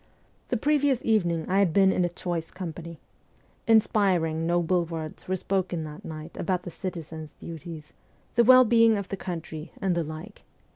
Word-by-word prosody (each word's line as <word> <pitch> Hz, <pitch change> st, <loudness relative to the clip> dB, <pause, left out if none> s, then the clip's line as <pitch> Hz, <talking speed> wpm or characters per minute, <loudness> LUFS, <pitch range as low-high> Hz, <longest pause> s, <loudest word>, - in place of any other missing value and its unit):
The 245 Hz, -, +1 dB
previous 285 Hz, 0 st, +1 dB
evening 175 Hz, -8 st, +1 dB
I 190 Hz, +2 st, +2 dB
had 190 Hz, -5 st, +3 dB
been 195 Hz, -1 st, +5 dB
in 185 Hz, -, +1 dB
a 175 Hz, -, +1 dB
choice 170 Hz, -2 st, -4 dB
company. 170 Hz, -2 st, -7 dB, 0.7 s
Inspiring, 185 Hz, -8 st, +3 dB
noble 175 Hz, +1 st, +2 dB
words 160 Hz, -2 st, -7 dB
were 185 Hz, -, 0 dB
spoken 185 Hz, -3 st, -1 dB
that 150 Hz, 0 st, -9 dB
night 155 Hz, +1 st, -8 dB
about 180 Hz, 0 st, -1 dB
the 175 Hz, -, -7 dB
citizen's 160 Hz, -4 st, -7 dB
duties, 165 Hz, -1 st, -9 dB, 0.4 s
the 235 Hz, -, +5 dB
well 255 Hz, +2 st, +8 dB
being 230 Hz, -1 st, +5 dB
of 200 Hz, -1 st, -5 dB
the -, -, -2 dB
country, 165 Hz, -4 st, -6 dB
and 190 Hz, -2 st, +1 dB
the 170 Hz, -1 st, 0 dB
like. 155 Hz, +7 st, -9 dB
175 Hz, 165 wpm, -27 LUFS, 160-200 Hz, 0.7 s, well